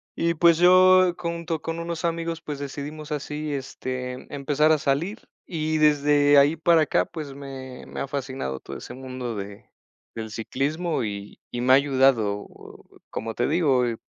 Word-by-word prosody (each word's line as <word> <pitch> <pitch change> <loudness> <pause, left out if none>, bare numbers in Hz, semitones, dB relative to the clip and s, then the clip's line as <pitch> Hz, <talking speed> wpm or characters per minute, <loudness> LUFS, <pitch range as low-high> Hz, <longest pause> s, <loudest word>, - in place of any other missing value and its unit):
Y, 170 0 0
pues, 170 0 +5
yo 185 +1 +6
junto 170 -2 -3
con 165 0 -4
unos 170 0 -4
amigos, 165 0 -2
pues, 150 -3 -5
decidimos 145 +2 -6
así, 150 +1 -4
este, 130 -2 -5
empezar 145 +2 +2
a 155 - +5
salir, 155 +9 -2 0.2
y 155 -2 -1
desde 145 -1 +4
ahí 140 +3 +5
para 165 0 +4
acá, - - +2
pues, 150 -4 -7
me 135 -2 -9
me - - -8
ha - - -2
fascinado 130 - -4
todo - - -8
ese - - -9
mundo 130 -2 -6
de 100 0 -7 0.5
del 110 -1 -6
ciclismo 145 +9 -2
y 100 -1 -6
y 120 - -4
me 125 +2 +4
ha - - +10
ayudado, 130 -7 +2 0.6
como 115 +1 -4
te 120 - 0
digo, 145 -6 +3
eh, 115 -2 -2
145 Hz, 165 wpm, -25 LUFS, 130-165 Hz, 0.6 s, ha